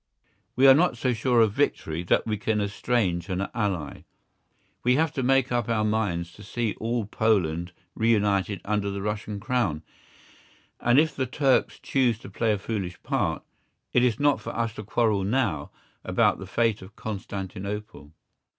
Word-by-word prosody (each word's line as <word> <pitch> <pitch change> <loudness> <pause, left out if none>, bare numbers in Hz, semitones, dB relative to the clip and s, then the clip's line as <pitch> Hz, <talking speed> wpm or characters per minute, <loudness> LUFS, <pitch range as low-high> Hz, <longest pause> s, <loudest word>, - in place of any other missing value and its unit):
We 130 - +4
are 135 - +10
not 155 -3 +2
so 125 +1 +1
sure 120 +1 +2
of 110 -2 +4
victory 85 - 0
that - - +2
we 110 -2 -1
can 105 +1 -1
estrange 100 -4 -1
an 95 +1 -1
ally. 95 -10 -3 0.8
We 125 +1 +4
have 160 +1 +2
to 135 - -2
make 130 0 +2
up 120 0 0
our 110 -2 +1
minds 100 -6 -1
to - - -15
see 115 +1 -2
all 115 0 -1
Poland 90 -6 0 0.2
reunited 105 -3 +1
under 105 -1 0
the 100 0 -4
Russian 105 0 -3
Crown, 110 -9 -1 1.0
and 120 +2 +3
if 155 -2 +2
the 130 -1 -1
Turks 135 +1 +2
choose 125 -5 +1
to - - -12
play 115 -2 +1
a 105 - +1
foolish 95 -4 -4
part, - - -1 0.5
it 125 - +4
is 125 -1 +2
not 145 -1 +3
for - - -6
us 115 -1 -1
to 110 - -7
quarrel 105 -1 +1
now 100 - 0 0.3
about - - +2
the 95 - -8
fate 115 +2 +1
of 95 +3 -13
Constantinople. 100 -5 -6
110 Hz, 170 wpm, -26 LUFS, 100-120 Hz, 1.0 s, are